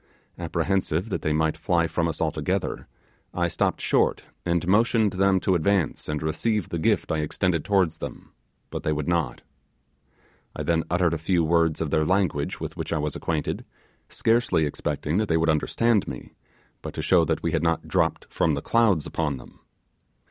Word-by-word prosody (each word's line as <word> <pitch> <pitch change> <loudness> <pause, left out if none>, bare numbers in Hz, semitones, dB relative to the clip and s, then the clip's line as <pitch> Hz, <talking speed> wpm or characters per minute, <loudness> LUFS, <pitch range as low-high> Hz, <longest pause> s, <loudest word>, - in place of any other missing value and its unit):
Apprehensive 85 +2 -1
that - - -2
they 75 - 0
might 80 +1 +1
fly 85 -3 +1
from 85 0 0
us 80 - -4
altogether, - - -2 0.5
I - - +1
stopped - - -1
short - - +2 0.2
and 85 +1 0
motioned 110 0 +3
them 95 0 +3
to 95 - +2
advance 90 -2 0
and 75 0 -2
receive 95 +6 -1
the 85 - -3
gift 80 - +1
I 80 - 0
extended 85 +1 0
towards 90 -5 +1
them, - - -8 0.4
but - - -4
they 75 - 0
would 75 -1 -3
not; 85 -8 0 1.1
I - - -3
then 85 -1 +1
uttered 85 -1 +2
a 80 - -2
few 85 +1 +1
words 80 -1 +2
of 80 -3 -2
their 80 - +3
language 90 -5 0
with - - -5
which - - -5
I 80 - +1
was 75 -1 -2
acquainted, 80 -3 -2 0.5
scarcely 115 -8 +2
expected 75 +3 -2
that 110 - 0
they 80 - +3
would 80 0 +2
understand 105 +8 +2
me, - - -8 0.5
but - - -7
to - - -3
show 90 -3 +4
that 80 0 -1
we 85 - 0
had 80 - +1
not 85 0 0
dropped - - 0
from 80 -3 +1
the 70 - -3
clouds 110 -9 +3
upon 75 -4 -2
them. - - -15
85 Hz, 185 wpm, -25 LUFS, 80-95 Hz, 1.1 s, show